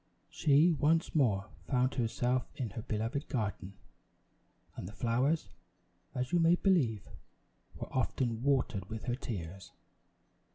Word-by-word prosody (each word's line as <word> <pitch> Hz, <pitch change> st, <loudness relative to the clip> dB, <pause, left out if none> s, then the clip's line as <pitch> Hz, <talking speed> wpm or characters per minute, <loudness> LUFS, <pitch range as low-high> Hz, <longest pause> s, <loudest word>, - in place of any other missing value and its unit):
She 150 Hz, +4 st, +4 dB
once 160 Hz, +3 st, +2 dB
more 110 Hz, -10 st, +2 dB, 0.2 s
found 130 Hz, 0 st, +2 dB
herself 125 Hz, +1 st, 0 dB
in 120 Hz, -6 st, -3 dB
her 115 Hz, -, -5 dB
beloved 115 Hz, +5 st, -2 dB
garden, 105 Hz, -5 st, -3 dB, 1.0 s
and -, -, -6 dB
the 105 Hz, -, -9 dB
flowers, 125 Hz, +3 st, +1 dB, 0.7 s
as 125 Hz, 0 st, -2 dB
you 175 Hz, -, +3 dB
may 165 Hz, +1 st, +5 dB
believe, 140 Hz, -, +1 dB, 0.7 s
were -, -, -8 dB
often 120 Hz, -2 st, 0 dB
watered 125 Hz, -8 st, 0 dB
with 110 Hz, -1 st, -6 dB
her 120 Hz, -, -1 dB
tears. 95 Hz, -, -6 dB
125 Hz, 125 wpm, -32 LUFS, 110-140 Hz, 1.0 s, may